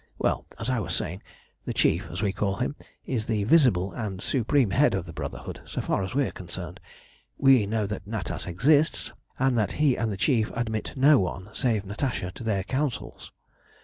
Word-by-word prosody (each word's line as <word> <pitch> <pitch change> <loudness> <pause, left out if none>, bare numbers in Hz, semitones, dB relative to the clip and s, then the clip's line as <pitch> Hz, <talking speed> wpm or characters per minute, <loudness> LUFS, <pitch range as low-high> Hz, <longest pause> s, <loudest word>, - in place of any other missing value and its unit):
Well, - - 0
as 115 +3 -1
I 125 - +1
was 85 -5 -2
saying, 90 +5 -3 0.4
the - - -4
Chief, - - +2
as 90 +5 -4
we 100 -2 +1
call 100 0 0
him, 125 +6 -2 0.3
is 115 -5 -2
the 110 -3 +1
visible 110 - +4
and 105 -6 -4
supreme 125 0 +1
head 135 -2 +4
of 95 - -2
the 85 - -9
Brotherhood 70 -5 -6
so - - -5
far - - 0
as 95 +5 -4
we 140 -1 +3
are - - -3
concerned. 90 0 -7 0.6
We 130 -6 +5
know 110 0 0
that 100 -1 -5
Natas 105 -5 -4
exists, 145 - +2 0.2
and 135 -1 +2
that 105 - 0
he 145 -4 +3
and 115 -2 -1
the 100 - -4
Chief 115 0 +2
admit 110 -2 -2
no 140 +2 +6
one 95 +1 -3
save 110 -6 0
Natasha 105 -2 -2
to 120 - -9
their 100 -4 0
councils. 135 +3 -3
110 Hz, 195 wpm, -27 LUFS, 95-130 Hz, 0.6 s, no